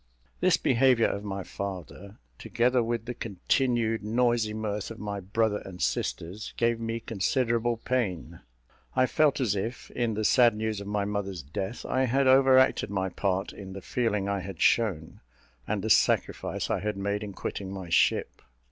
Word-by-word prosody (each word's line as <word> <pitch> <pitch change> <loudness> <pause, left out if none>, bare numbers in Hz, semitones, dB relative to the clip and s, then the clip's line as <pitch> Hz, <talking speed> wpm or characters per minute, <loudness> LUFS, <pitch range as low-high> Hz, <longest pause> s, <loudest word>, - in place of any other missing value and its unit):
This - - +4
behaviour 125 -2 +3
of 100 - -2
my 100 -2 -4
father, 100 +1 -7 0.2
together 125 +1 +1
with 115 -1 -2
the 125 - -4
continued 115 +2 0
noisy 115 0 +1
mirth 105 -1 -3
of 115 - -8
my 105 -2 -4
brother 105 +2 0
and 90 -2 -10
sisters, 90 +6 -3
gave 115 -1 +1
me 115 0 -3
considerable 115 +2 0
pain. 95 -10 -2 0.6
I 130 - +4
felt 145 +1 +2
as 115 -6 +1
if, 115 +5 -4
in 120 -3 -1
the 110 +1 -1
sad 120 -2 +5
news 110 -1 -2
of 100 - -8
my 105 -1 -1
mother's 100 -4 -3
death, 95 - -5
I 130 0 +1
had 135 +3 +2
over 130 0 +6
acted 130 0 +3
my 95 -1 -1
part 95 +1 -1
in 95 -2 -9
the 95 - -7
feeling 105 -5 -1
I 100 0 0
had 95 -2 -7
shown, 95 -9 +1 0.5
and - - -2
the - - -2
sacrifice - - +1
I - - +1
had 105 +1 -3
made 100 +1 -2
in 105 -2 -6
quitting 95 0 -5
my 95 -3 -7
ship. - - +2
105 Hz, 175 wpm, -28 LUFS, 100-120 Hz, 0.6 s, over